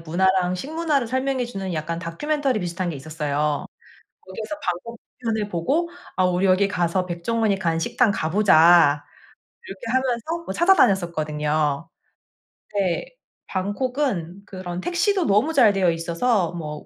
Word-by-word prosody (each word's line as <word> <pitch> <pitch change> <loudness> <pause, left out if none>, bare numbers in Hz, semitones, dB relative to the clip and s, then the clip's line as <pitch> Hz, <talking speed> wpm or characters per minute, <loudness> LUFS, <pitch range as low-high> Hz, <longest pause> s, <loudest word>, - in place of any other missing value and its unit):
문화랑 180 +2 +1
식문화를 295 - -1
설명해 260 0 -1
주는 195 -5 -5
약간 165 +1 -3
다큐멘터리 265 - -1
비슷한 175 0 -3
게 - - -5
있었어요. 150 0 -2 0.6
거기서 215 +9 -6
방콕 230 +1 -4 0.2
편을 220 -4 -2
보고 280 - 0 0.3
"아 185 - +2
우리 180 +1 +1
여기 190 +1 +4
가서 180 -1 -1
백종원이 200 +4 0
간 165 -3 0
식당 205 +6 +2
가 160 -5 -2
보자." 165 -6 +5 0.6
이렇게 195 +2 -9
하면서 260 +7 -1
어 - - -3
찾아다녔었거든요. 155 - +2 0.9
네. 190 - 0 0.4
방콕은 200 - -2
그런 180 -3 -6
택시도 360 - +1
너무 215 +11 +2
잘되어 200 - +4
있어서 170 +3 0
뭐 150 -3 -6
190 Hz, 305 characters per minute, -23 LUFS, 170-240 Hz, 0.9 s, 보자